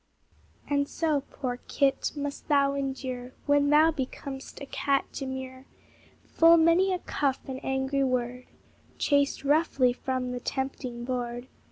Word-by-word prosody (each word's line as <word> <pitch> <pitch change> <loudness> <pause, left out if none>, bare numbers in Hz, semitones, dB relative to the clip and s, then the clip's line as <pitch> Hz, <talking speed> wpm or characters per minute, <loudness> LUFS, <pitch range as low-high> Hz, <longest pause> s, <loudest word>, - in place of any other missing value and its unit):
And 285 0 0
so, 310 -4 0
poor 250 -3 -4
kit! 275 -1 +1
must 285 -1 -5
thou 280 -2 +3
endure, 260 -2 -4
When 285 0 +3
thou 310 +2 +6
becom'st 270 -1 -6
a - - -6
cat 275 0 0
demure, 260 -1 -6 0.6
Full 330 +1 +5
many 335 +4 +4
a 365 - +1
cuff 280 -6 -1
and 265 -1 -6
angry 265 +1 0
word, 250 -1 -1 0.5
Chased 285 -1 +1
roughly 280 -4 +3
from 255 0 -3
the 250 - -3
tempting 255 -2 -4
board. 245 0 -4
270 Hz, 135 wpm, -28 LUFS, 255-285 Hz, 0.6 s, thou